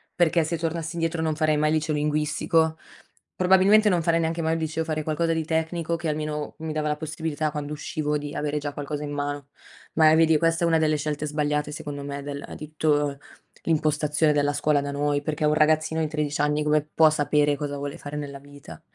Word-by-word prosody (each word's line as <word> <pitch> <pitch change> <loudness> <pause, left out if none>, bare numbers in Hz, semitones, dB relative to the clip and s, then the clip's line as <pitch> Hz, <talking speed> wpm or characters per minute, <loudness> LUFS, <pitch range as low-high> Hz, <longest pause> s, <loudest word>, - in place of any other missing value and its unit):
Perché 170 -1 +3
se 160 +1 -3
tornassi 165 0 -3
indietro 165 0 -1
non 155 -1 0
farei 155 -1 +2
mai 155 0 +2
il 155 - +2
liceo 155 0 -1
linguistico. 155 +2 +1 0.6
Probabilmente 190 +4 +5
non 175 -3 +2
farei 165 0 +2
neanche 165 +1 -1
mai 160 0 +1
un 165 - -1
liceo, 160 0 -2
farei 155 -1 -2
qualcosa 165 +2 0
di 160 - -1
tecnico 160 +1 -1
che 165 -1 -4
almeno 150 0 -3
mi 160 -1 -4
dava 155 0 -1
la 150 - 0
possibilità, 155 0 -3
quando 150 0 -4
uscivo, 150 0 -2
di 145 0 -6
avere 150 0 -2
già 145 0 -4
qualcosa 145 +1 -5
in 145 - -5
mano. 145 -1 -3 0.5
Ma, 155 -1 +6
eh, - - +5
vedi, 160 -1 +5
questa 165 +1 +1
è - - +4
una 165 -1 +3
delle 155 -1 +2
scelte 150 0 -2
sbagliate 150 0 -1
secondo 145 -1 -6
me 140 0 -5
del 140 0 -6
di 150 - -8
tutto 145 -2 +1 0.4
l'impostazione 155 -1 +1
della 145 0 +1
scuola 145 0 +2
da 140 0 -3
noi, 145 0 0
perché 155 +1 -3
un 150 0 +3
ragazzino 155 +1 +2
di 155 - +1
13 150 -1 -2
anni 150 +1 +1
come 150 0 +3
può 160 -1 +6
sapere 145 -1 +2
cosa 145 -1 -4
vuole 140 0 -5
fare 145 +1 -8
nella 140 -2 -5
vita? 140 - -13
150 Hz, 215 wpm, -25 LUFS, 145-160 Hz, 0.6 s, Ma